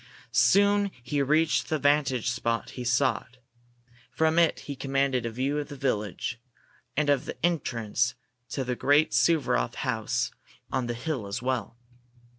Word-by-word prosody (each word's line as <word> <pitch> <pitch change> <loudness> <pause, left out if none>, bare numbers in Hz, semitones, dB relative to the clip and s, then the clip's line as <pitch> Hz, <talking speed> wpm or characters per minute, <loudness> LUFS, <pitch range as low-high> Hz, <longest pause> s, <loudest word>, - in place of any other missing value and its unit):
Soon 200 0 +4
he 140 +3 -1
reached 155 +3 +2
the 155 - +1
vantage 140 -4 +2
spot 115 -1 -2
he 125 - -6
sought. 125 0 0 0.7
From 160 +1 +2
it 170 -1 +3
he 140 - -6
commanded 135 -2 0
a - - -2
view 135 +6 -1
of 145 - -4
the 145 - -8
village, 120 -3 -2 0.6
and 150 -1 +2
of 140 -3 +2
the - - -6
entrance 120 -7 0 0.3
to 135 - -2
the 125 0 -2
great 145 +5 +3
Suvaroff 145 - +2
house - - -1 0.4
on 130 -2 -1
the 120 - -2
hill 125 -4 -3
as 105 +5 -4
well. 125 -4 -2
135 Hz, 150 wpm, -27 LUFS, 120-150 Hz, 0.7 s, Soon